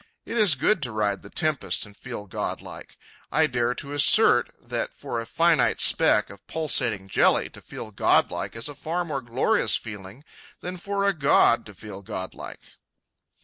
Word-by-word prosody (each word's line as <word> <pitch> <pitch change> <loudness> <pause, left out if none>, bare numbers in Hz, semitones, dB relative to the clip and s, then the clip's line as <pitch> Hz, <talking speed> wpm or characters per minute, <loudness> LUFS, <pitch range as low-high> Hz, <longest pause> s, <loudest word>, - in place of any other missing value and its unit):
It - - -6
is 210 -9 +5
good 175 +7 +1
to 125 -3 0
ride 105 -2 -1
the 100 - -13
tempest 155 -4 -1
and 100 -1 -16
feel 120 -3 -8
godlike. 95 - -6 0.3
I 160 - +4
dare 125 -3 0
to 140 +2 -7
assert 145 - +4
that - - -4
for 115 - -4
a 115 - -9
finite 165 +3 +2
speck - - +3
of 100 0 -16
pulsating 115 -11 0
jelly - - +2
to - - -11
feel - - -9
godlike - - +1
is 115 +3 -3
a 145 - -6
far 170 +5 -3
more 145 -5 -3
glorious 130 - +2
feeling 105 +3 -8 0.4
than 180 +1 -6
for 200 +2 -2
a 200 0 +3
god 140 -7 +3
to 105 - -13
feel 100 0 -9
godlike. 95 -2 -8
125 Hz, 170 wpm, -25 LUFS, 105-160 Hz, 0.4 s, is